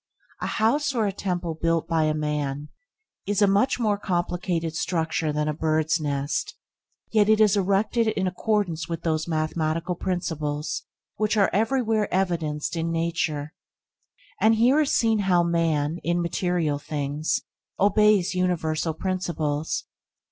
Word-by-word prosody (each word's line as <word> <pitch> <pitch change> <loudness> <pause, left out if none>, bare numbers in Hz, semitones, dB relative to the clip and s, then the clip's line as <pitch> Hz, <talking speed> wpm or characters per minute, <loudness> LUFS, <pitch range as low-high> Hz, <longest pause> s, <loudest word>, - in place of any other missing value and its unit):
A - - -1
house 280 +6 +1
or 225 -3 +2
a 200 - 0
temple 180 -3 -3
built 165 0 0
by 160 -2 +2
man 150 -1 -2 0.6
is 205 0 +1
a 205 - +6
much 200 +7 +2
more 210 -3 +1
complicated 175 -3 -2
structure 165 -2 -1
than 150 0 -1
a 150 - 0
bird's 155 +1 +1
nest, 145 -1 -2 0.6
yet 215 -1 +3
it 220 0 +5
is 210 -2 +5
erected 200 +4 +1
in 195 -3 0
accordance 185 -3 -1
with 165 -1 -4
those 160 -1 0
mathematical 160 +2 -1
principles 160 -5 -3 0.3
which 215 +1 +1
are 200 - +3
everywhere 225 0 +1
evidenced 170 -5 -1
in 165 0 -1
nature. 165 -3 -1 0.9
And 220 +1 +4
here 245 +6 +4
is 300 -2 +2
seen 225 -2 +2
how 180 -3 +3
man, 165 -2 0
in 170 +1 0
material 170 -3 0
things, 145 0 -2 0.4
obeys 205 -2 +4
universal 165 -3 0
principles. 160 -4 -2
170 Hz, 135 wpm, -25 LUFS, 155-200 Hz, 0.9 s, a